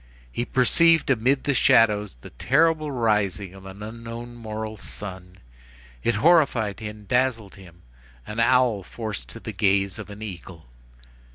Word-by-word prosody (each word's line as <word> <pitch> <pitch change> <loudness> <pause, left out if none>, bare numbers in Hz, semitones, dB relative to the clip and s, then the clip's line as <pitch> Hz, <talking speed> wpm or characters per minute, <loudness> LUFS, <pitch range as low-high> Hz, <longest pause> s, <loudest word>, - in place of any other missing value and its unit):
He 120 - -2
perceived 160 +6 +4
amid 130 +3 +2
the 140 - +1
shadows 105 - +3
the - - -11
terrible 155 - +2
rising 105 -6 0
of 95 0 -12
an 95 +2 -10
unknown 115 +2 -8
moral 110 -1 -6
sun; 95 -2 -9 0.6
it 115 - +1
horrified 120 - +3
and 105 -1 -8
dazzled 125 -5 0
him. 90 -3 -16 0.4
An 105 - -6
owl 120 -3 +3
forced 105 - -6
to - - -10
the - - -6
gaze 100 -1 +1
of 105 - -8
an 105 +1 -9
eagle. 90 - -9
110 Hz, 145 wpm, -24 LUFS, 100-125 Hz, 0.6 s, perceived